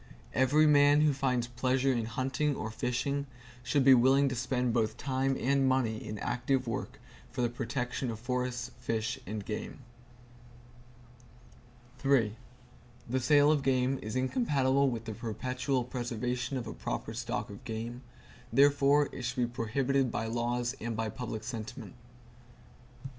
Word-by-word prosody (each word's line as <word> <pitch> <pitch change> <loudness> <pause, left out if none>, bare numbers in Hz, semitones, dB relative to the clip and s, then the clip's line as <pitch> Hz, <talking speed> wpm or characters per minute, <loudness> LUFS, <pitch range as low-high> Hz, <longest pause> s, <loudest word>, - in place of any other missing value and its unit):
Every 145 +4 +4
man 145 0 +6
who 150 -1 +4
finds 130 -3 0
pleasure 130 +2 +1
in 115 -2 -1
hunting 130 +5 -1
or 110 - -4
fishing 140 +5 -1 0.3
should 130 +3 +1
be 135 - +9
willing 135 +3 +5
to 130 - -3
spend 125 0 0
both 110 -2 0
time 135 0 0
and 135 0 +2
money 120 -4 0
in 105 - -5
active 125 +4 0
work 120 +3 -4 0.3
for 125 - -2
the 120 - +2
protection 125 +1 -3
of 110 -1 -5
forests, 125 0 -2
fish 115 -1 -2
and 105 0 -4
game. 110 +4 -5 2.2
The 130 -7 +3 0.9
sale 145 +3 +5
of 150 -2 +2
game 130 0 +1
is 110 +3 -5
incompatible 135 - +2
with 115 -2 -4
the 110 - -4
perpetual 125 +4 -2
preservation 125 +1 -3
of 120 - -4
a 110 - -6
proper 110 - -4
stock 120 -1 -3
of 100 +6 -11
game; 115 +1 -5 0.5
therefore 140 +2 +5
it - - -6
should 120 - -3
be 125 - +2
prohibited 125 +3 0
by 110 - -2
laws 120 +2 -1
and 115 -1 -3
by 110 -1 -1
public 110 -2 -5
sentiment. 115 -2 -6
125 Hz, 145 wpm, -31 LUFS, 115-135 Hz, 2.2 s, be